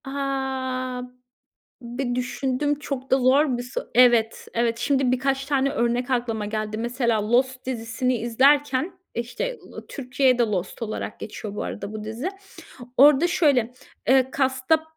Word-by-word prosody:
Ha. 265 Hz, -2 st, -3 dB, 0.8 s
Bir 245 Hz, +1 st, -3 dB
düşündüm 265 Hz, +3 st, -1 dB
çok 270 Hz, -3 st, -5 dB
da 265 Hz, -, +6 dB
zor 260 Hz, +1 st, +3 dB
bir 245 Hz, -, -4 dB
so 245 Hz, -, -4 dB
Evet, 240 Hz, -2 st, +4 dB
evet. 230 Hz, 0 st, +1 dB
Şimdi 270 Hz, -2 st, +2 dB
birkaç 270 Hz, +1 st, 0 dB
tane 275 Hz, -1 st, +1 dB
örnek 240 Hz, +1 st, 0 dB
aklıma 235 Hz, -4 st, -1 dB
geldi. 215 Hz, 0 st, -3 dB
Mesela 235 Hz, -2 st, 0 dB
Lost 255 Hz, +1 st, +1 dB
dizisini 250 Hz, 0 st, -1 dB
izlerken 270 Hz, -, +2 dB, 0.2 s
işte 355 Hz, -, -3 dB, 0.3 s
Türkçe'ye 255 Hz, -1 st, +1 dB
de -, -, +5 dB
Lost 200 Hz, -1 st, -3 dB
olarak 215 Hz, -1 st, -4 dB
geçiyor 210 Hz, -1 st, -7 dB
bu -, -, -3 dB
arada 205 Hz, 0 st, -6 dB
bu 215 Hz, -1 st, -5 dB
dizi. 225 Hz, +10 st, -4 dB, 0.7 s
Orada 290 Hz, +4 st, +7 dB
şöyle, 275 Hz, -9 st, +2 dB, 0.3 s
eee, 265 Hz, 0 st, +4 dB
cast'ta 265 Hz, +3 st, +2 dB
p 315 Hz, -, -15 dB
255 Hz, 140 wpm, -24 LUFS, 235-270 Hz, 0.8 s, Orada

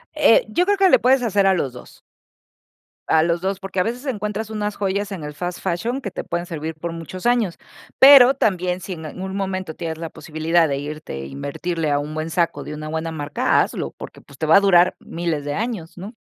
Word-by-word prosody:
Eh, -, -, +5 dB
yo 355 Hz, -, +1 dB
creo 405 Hz, +1 st, +2 dB
que 385 Hz, -1 st, +5 dB
le -, -, +6 dB
puedes 255 Hz, +1 st, +4 dB
hacer 200 Hz, -3 st, +2 dB
a 190 Hz, -, +5 dB
los 140 Hz, -8 st, -1 dB
2. 125 Hz, -, -13 dB, 1.1 s
A 160 Hz, 0 st, +4 dB
los 170 Hz, 0 st, +1 dB
2, 190 Hz, +2 st, -3 dB
porque 195 Hz, -1 st, -4 dB
a 180 Hz, -, +4 dB
veces 245 Hz, +4 st, -4 dB
encuentras 210 Hz, -3 st, -3 dB
unas 210 Hz, -1 st, -3 dB
joyas 200 Hz, +1 st, -2 dB
en 170 Hz, -6 st, -6 dB
el 150 Hz, 0 st, -6 dB
fast 175 Hz, +3 st, -5 dB
fashion 225 Hz, +9 st, -2 dB
que 200 Hz, -6 st, -5 dB
te -, -, -6 dB
pueden 175 Hz, +1 st, -3 dB
servir 160 Hz, -1 st, -5 dB
por 165 Hz, +2 st, -5 dB
muchos 165 Hz, +4 st, -8 dB
años. 240 Hz, -7 st, +1 dB, 0.4 s
Pero, 270 Hz, -1 st, +9 dB
también 185 Hz, -7 st, 0 dB
si 190 Hz, -, -5 dB
en 160 Hz, -2 st, -8 dB
algún 190 Hz, +5 st, -6 dB
momento 190 Hz, -4 st, -3 dB
tienes 160 Hz, -2 st, -5 dB
la 165 Hz, -1 st, -5 dB
posibilidad 160 Hz, +2 st, 0 dB
de 140 Hz, -2 st, -1 dB
irte 150 Hz, +2 st, -6 dB
e -, -, -7 dB
invertirle 155 Hz, -, -3 dB
a 145 Hz, 0 st, +2 dB
un 150 Hz, +1 st, -5 dB
buen 155 Hz, +1 st, -3 dB
saco 170 Hz, +1 st, -1 dB
de -, -, -6 dB
una 155 Hz, 0 st, -6 dB
buena 160 Hz, +1 st, -3 dB
marca, 145 Hz, -2 st, +1 dB
hazlo, -, -, -3 dB
porque -, -, -10 dB
pues 140 Hz, -, -17 dB
te 160 Hz, -, -2 dB
va 160 Hz, -, +6 dB
a -, -, +8 dB
durar 180 Hz, -3 st, +4 dB
miles 165 Hz, -4 st, -3 dB
de 145 Hz, -, -2 dB
años, 200 Hz, -5 st, -4 dB
¿no?, 200 Hz, +6 st, -8 dB
175 Hz, 230 wpm, -21 LUFS, 160-205 Hz, 1.1 s, Pero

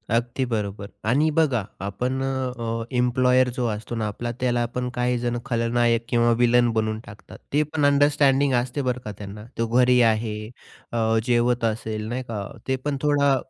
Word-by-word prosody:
अगदी 120 Hz, +3 st, 0 dB
बरोबर 105 Hz, -4 st, -3 dB, 0.2 s
आणि 145 Hz, +6 st, +3 dB
बघा 135 Hz, -9 st, +3 dB, 0.2 s
आपण 125 Hz, +6 st, -2 dB
अ, 125 Hz, -4 st, -2 dB
एम्प्लॉयर 125 Hz, +1 st, +3 dB
जो 125 Hz, -, 0 dB
असतो 110 Hz, +2 st, -4 dB
ना 110 Hz, -2 st, -1 dB
आपला 120 Hz, +3 st, -4 dB
त्याला 120 Hz, -1 st, +1 dB
आपण 125 Hz, +1 st, -3 dB
काही 125 Hz, 0 st, +1 dB
जण 120 Hz, 0 st, -1 dB
खलनायक 115 Hz, 0 st, +1 dB
किंवा 120 Hz, -1 st, +3 dB
विलन 120 Hz, 0 st, +4 dB
बनवून 110 Hz, 0 st, 0 dB
टाकतात. 105 Hz, 0 st, -12 dB, 0.2 s
ते 150 Hz, +1 st, +4 dB
पण 150 Hz, -1 st, -1 dB
अंडरस्टँडिंग 145 Hz, -1 st, +3 dB
असते 130 Hz, +3 st, -4 dB
बरं 125 Hz, -1 st, -1 dB
का 105 Hz, -, -4 dB
त्यांना. 105 Hz, +1 st, -9 dB
तो 115 Hz, -, 0 dB
घरी 125 Hz, 0 st, +5 dB
आहे 110 Hz, -1 st, +2 dB, 0.5 s
अ, 115 Hz, -1 st, +1 dB
जेवत 120 Hz, 0 st, +2 dB
असेल 110 Hz, -1 st, -2 dB
नाही 125 Hz, +3 st, -3 dB
का? 105 Hz, -5 st, -5 dB, 0.2 s
ते 130 Hz, -, +1 dB
पण 145 Hz, -2 st, 0 dB
थोडा 145 Hz, -2 st, +3 dB
120 Hz, 170 wpm, -24 LUFS, 115-130 Hz, 0.5 s, घरी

